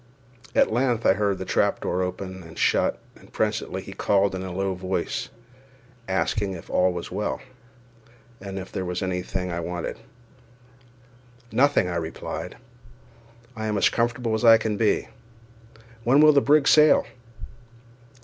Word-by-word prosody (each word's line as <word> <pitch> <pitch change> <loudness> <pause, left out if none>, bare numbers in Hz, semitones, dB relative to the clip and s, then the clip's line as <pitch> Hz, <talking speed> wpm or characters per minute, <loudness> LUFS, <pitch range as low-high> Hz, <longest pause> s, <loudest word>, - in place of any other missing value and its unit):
At - - +3
length 120 -1 +1
I - - +6
heard 100 -1 0
the 95 - -6
trap - - 0
open 95 +1 -3
and 80 -2 -13
shut, - - +2 0.2
and - - -19
presently - - -2
he - - -9
called 100 -1 +1
in 95 - -4
a 95 -1 -5
low 95 +1 -1
voice, 95 +1 -3 0.8
asking 95 +1 -1
if 85 - -10
all 90 0 +3
was 85 -1 -6
well, 105 - -2 1.0
and 95 0 -6
if 95 0 -7
there 95 - -3
was 90 0 -3
any 90 -1 -1
thing 90 0 -4
I 85 - -3
wanted. 85 0 -5 1.5
"Nothing," 140 -7 +3
I 85 -1 -2
replied; 80 -1 -6 1.0
"I 110 -1 -4
am 105 -1 -1
as - - +4
comfortable 120 -1 -1
as 115 0 +6
can 110 -1 -2
be; 110 0 +1 1.0
when 130 +5 +4
will 155 0 +7
the 140 - +5
brig 145 +1 +4
sail?" 155 0 +6
95 Hz, 150 wpm, -24 LUFS, 90-115 Hz, 1.5 s, will